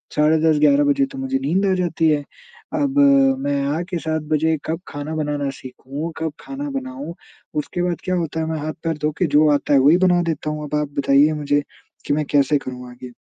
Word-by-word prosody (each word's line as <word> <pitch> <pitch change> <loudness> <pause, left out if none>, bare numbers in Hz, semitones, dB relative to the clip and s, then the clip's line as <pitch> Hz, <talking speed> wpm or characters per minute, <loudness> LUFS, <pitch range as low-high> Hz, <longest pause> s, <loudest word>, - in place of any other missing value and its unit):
साढ़े 155 +1 +4
10 150 -1 +3
11 280 - +4
बजे 285 -1 +3
तो 275 - -9
मुझे 270 0 -1
नींद 195 -6 +1
आ 190 - +2
जाती 170 -3 +1
है। 145 -1 +1 0.5
अब 285 -2 0 0.4
मैं 140 - -1 0.2
आके 175 +1 -3
7 160 -1 -2
बजे 160 +1 +2
कब 160 +2 -2
खाना 145 +2 -5
बनाना 145 -2 -2
सीखूँ, 140 +5 -7
कब 160 -1 -2
खाना 285 +1 -6
बनाऊँ। 270 -8 -6 0.4
उसके 150 +4 -2
बाद 175 -1 -2
क्या 185 0 0
होता 165 -2 -2
है 160 - -1
मैं 160 - -2
हाथ-पैर 155 +1 -3
धो 150 - +2
के 180 - +3
जो 155 - +5
आता 145 0 0
है 135 - +6
वही 145 +6 +5
बना 175 -1 +3
देता 155 -1 -4
हूँ। 150 0 -4
अब 150 - -2
आप 150 - -3
बताइए 140 +3 +4
मुझे 145 0 +2 0.4
कि - - 0
मैं 150 +1 0
कैसे 145 0 +4
करूँ 125 -2 -8
आगे? 125 0 -11
155 Hz, 215 wpm, -21 LUFS, 145-180 Hz, 0.5 s, है